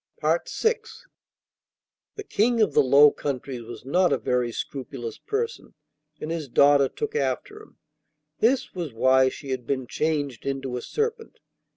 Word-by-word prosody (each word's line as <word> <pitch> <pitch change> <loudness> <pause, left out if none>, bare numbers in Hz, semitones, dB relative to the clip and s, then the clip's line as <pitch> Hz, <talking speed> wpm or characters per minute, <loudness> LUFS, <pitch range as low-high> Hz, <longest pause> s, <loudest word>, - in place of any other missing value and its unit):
VI - - +2 1.8
The 420 - -6
King 235 - +1
of 215 - +3
the - - +5
Low 140 +2 +7
Countries 130 -2 -4
was 115 +1 -10
not 180 +6 +2
a - - +3
very 125 -1 0
scrupulous 125 -2 -6
person, 455 +3 -4 0.4
and 155 - -5
his 165 -3 -3
daughter 140 +1 +5
took 445 0 -5
after 425 -2 -2
him. 430 - -18 0.6
This 255 +3 +2
was 170 -8 -5
why 130 +2 +4
she 135 +1 -8
had 125 -2 -4
been 130 -2 -1
changed 145 -3 -2
into 135 -2 -3
a 125 - -3
serpent. 450 - -3
140 Hz, 150 wpm, -25 LUFS, -, 1.8 s, Low